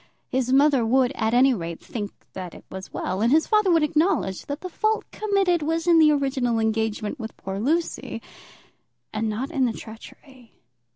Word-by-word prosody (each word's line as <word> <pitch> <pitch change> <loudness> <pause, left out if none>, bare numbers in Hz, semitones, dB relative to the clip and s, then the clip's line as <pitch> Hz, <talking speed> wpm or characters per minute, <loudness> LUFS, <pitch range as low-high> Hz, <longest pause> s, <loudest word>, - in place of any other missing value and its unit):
His 255 -1 0
mother 275 -2 +4
would, 250 +2 +3
at 220 +2 0
any 260 +2 +5
rate, 170 -6 -5
think 205 -4 -6 0.2
that 180 -2 -7
it - - -14
was 190 0 -8
well, 190 +2 -3
and 235 +2 +3
his 315 +2 +4
father 425 -3 +3
would 330 -3 +4
acknowledge 300 - 0
that 285 +1 -4
the 370 - -5
fault 435 +4 0
committed 390 -5 +1
was 325 +2 -1
in 340 -2 +5
the 310 -1 +6
original 270 -5 0
engagement 220 +2 -1
with 225 -2 -7
poor 195 0 -5
Lucy, 320 +9 -1 0.9
and 215 +1 -1
not 245 +8 -3
in 270 -5 +1
the 235 - 0
treachery. 240 +3 -13
260 Hz, 180 wpm, -24 LUFS, 220-315 Hz, 0.9 s, the